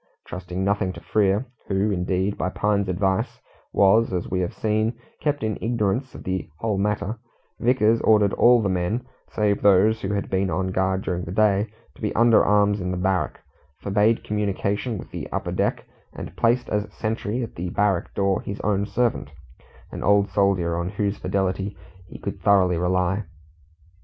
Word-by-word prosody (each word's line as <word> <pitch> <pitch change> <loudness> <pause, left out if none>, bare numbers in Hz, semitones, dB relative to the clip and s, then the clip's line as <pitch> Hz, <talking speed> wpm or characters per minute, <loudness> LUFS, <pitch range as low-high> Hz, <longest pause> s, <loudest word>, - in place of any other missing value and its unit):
Trusting 90 +1 -5
nothing 100 -1 +1
to - - -9
Frere 105 +2 +1 0.2
who, 100 +2 +1
indeed, 95 +1 0
by 95 - -1
Pine's 100 0 0
advice, 95 +1 0 0.3
was, 100 +4 +4
as 90 -2 -2
we 95 - 0
have 90 -1 -1
seen, 110 +1 0 0.2
kept 145 -3 -1
in 110 -1 -2
ignorance 115 +2 -1
of - - -9
the 95 -2 -3
whole 105 -1 -1
matter 105 +2 -1 0.4
Vickers 115 -2 +3
ordered 105 -2 +4
all 120 -1 +5
the - - +1
men, 95 +6 -1 0.2
save 105 -1 0
those 105 +3 +4
who 95 - -2
had 100 - -2
been 95 0 0
on 95 +3 -1
guard 95 0 0
during 90 -1 -2
the 85 - -6
day, 105 0 +2 0.3
to - - -19
be 105 - -2
under 115 -1 +5
arms 105 -1 +3
in 90 - -2
the 90 - -2
barrack, 90 -4 -1 0.4
forbade 105 +3 +2
communication 105 +2 -1
with - - -10
the - - -6
upper - - -2
deck, - - -1 0.3
and - - -8
placed 120 +2 +2
as 105 0 -1
sentry 110 +2 -2
at 115 - -7
the 90 +2 -4
barrack 100 -1 0
door 100 -1 +1
his 100 - -6
own 100 -1 0
servant, 120 -9 0 0.6
an - - -6
old 100 0 +3
soldier, 95 -4 +1
on 85 +1 -2
whose 100 0 -2
fidelity 95 +1 -1 0.3
he - - -10
could - - -6
thoroughly 95 -3 +4
rely. 90 +3 +1
100 Hz, 175 wpm, -24 LUFS, 95-110 Hz, 0.6 s, all